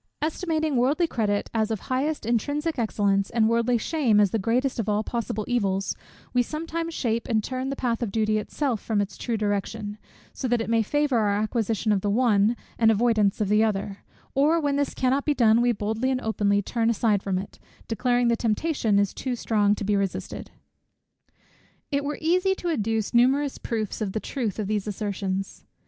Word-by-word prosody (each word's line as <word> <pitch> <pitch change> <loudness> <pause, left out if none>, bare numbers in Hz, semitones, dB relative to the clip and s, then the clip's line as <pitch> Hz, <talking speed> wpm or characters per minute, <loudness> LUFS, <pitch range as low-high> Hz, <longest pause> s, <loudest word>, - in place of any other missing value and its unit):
Estimating 315 -2 -1
worldly 280 +8 +2
credit 210 -9 -1
as 220 -1 +1
of 220 - -1
the - - -19
highest 275 +1 -1
intrinsic 285 +7 -1
excellence, 200 -3 +1
and 225 -2 +2
worldly 235 +1 +2
shame 240 -4 +2
as 205 -3 +4
the 225 - 0
greatest 245 +6 0
of 220 -1 -1
all 210 +1 +1
possible 220 -2 -3
evils, 195 -5 0 0.4
we 250 - +4
sometimes 330 +5 -3
shape 230 -2 -1
and 220 -2 +1
turn 255 +2 -3
the 275 - -2
path 240 -3 -1
of 230 -4 -2
duty 215 0 +1
itself 245 +1 -2
from 220 -2 -1
its 200 -1 -2
true 235 -2 -2
direction, 205 0 -2 0.3
so 260 - -3
as 240 - +3
it 225 0 -2
may 230 -1 +4
favour 285 +2 +1
our 205 -2 +2
acquisition 220 0 0
of 200 -2 +2
the 205 - -1
one, 220 0 +3 0.2
and 225 -1 +5
avoidance 220 -2 +2
of 210 - +1
the 210 +2 +4
other; 200 -2 -2 0.3
or 300 +5 +3
when 285 -3 0
this 285 -1 -1
cannot 260 +2 +1
be 295 - +1
done, 230 -2 +4
we 240 0 +3
boldly 220 +3 -1
and 255 -1 0
openly 205 -3 +1
turn 230 +2 0
aside 215 -3 +2
from 195 -2 -1
it, 190 +2 -7 0.3
declaring 245 +1 +1
the 235 - +3
temptation 230 -1 0
is 200 -1 +2
too 255 -2 -3
strong 210 -3 +2
to 210 - -5
be 205 +1 +1
resisted. 200 -2 -3 1.4
It 280 0 0
were 290 +1 -3
easy 365 +4 +2
to 355 - -4
adduce 225 -7 -1
numerous 265 +4 +3
proofs 220 -2 -3
of 195 -3 -2
the 220 - -1
truth 230 -4 -3
of 215 - -2
these 210 0 -2
assertions. 195 -2 -3
225 Hz, 195 wpm, -25 LUFS, 210-260 Hz, 1.4 s, and